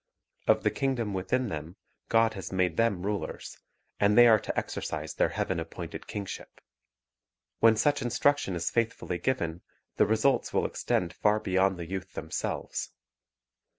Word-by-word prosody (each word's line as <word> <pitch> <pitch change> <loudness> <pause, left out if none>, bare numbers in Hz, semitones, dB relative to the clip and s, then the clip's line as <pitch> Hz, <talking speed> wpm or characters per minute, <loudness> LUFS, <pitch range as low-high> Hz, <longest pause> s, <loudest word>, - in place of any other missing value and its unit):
Of - - +4
the - - +2
kingdom 125 -6 -1
within 110 +7 0
them 80 +1 -6 0.3
God 115 0 +4
has 95 -4 -7
made 90 -3 +1
them 100 -5 +1
rulers, 105 0 -4 0.4
and 105 +2 +3
they 120 - +10
are 110 -2 +7
to - - -5
exercise 80 0 -3
their - - +2
Heaven - - -2
appointed 80 0 -7
kingship. 100 -2 -7 1.0
When 115 -1 +6
such 145 +5 +2
instruction 125 -4 +1
is 85 -1 -2
faithfully 115 -6 -1
given, 85 -6 -1 0.4
the - - +4
results 110 +5 +2
will - - +2
extend 90 -1 -1
far 105 +3 +2
beyond 95 -2 +1
the 85 - -5
youth 95 0 -5
themselves. 80 0 -3
100 Hz, 150 wpm, -29 LUFS, 90-115 Hz, 1.0 s, they